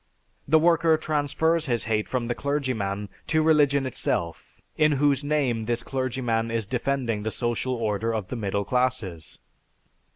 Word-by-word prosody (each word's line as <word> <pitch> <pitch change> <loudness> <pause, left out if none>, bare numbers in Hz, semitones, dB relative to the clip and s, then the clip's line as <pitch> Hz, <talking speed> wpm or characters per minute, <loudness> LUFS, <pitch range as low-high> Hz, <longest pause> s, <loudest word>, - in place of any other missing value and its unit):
The 160 +3 +5
worker 165 0 +4
transfers 155 +2 0
his 120 -3 +1
hate 110 -1 -1
from 125 -2 -1
the 120 - 0
clergyman 120 -9 -2 0.2
to 155 0 +2
religion 145 -3 +3
itself, 85 -9 -3 0.2
in 155 -1 +3
whose 145 0 +2
name 135 -7 0
this 120 +1 -1
clergyman 120 -4 -1
is 115 -2 -1
defending 125 -1 -1
the 110 - -2
social 120 +2 -2
order 110 -1 -1
of 110 -4 -3
the - - -4
middle 100 -3 -2
classes. 115 - -2
125 Hz, 150 wpm, -25 LUFS, 110-145 Hz, 0.2 s, The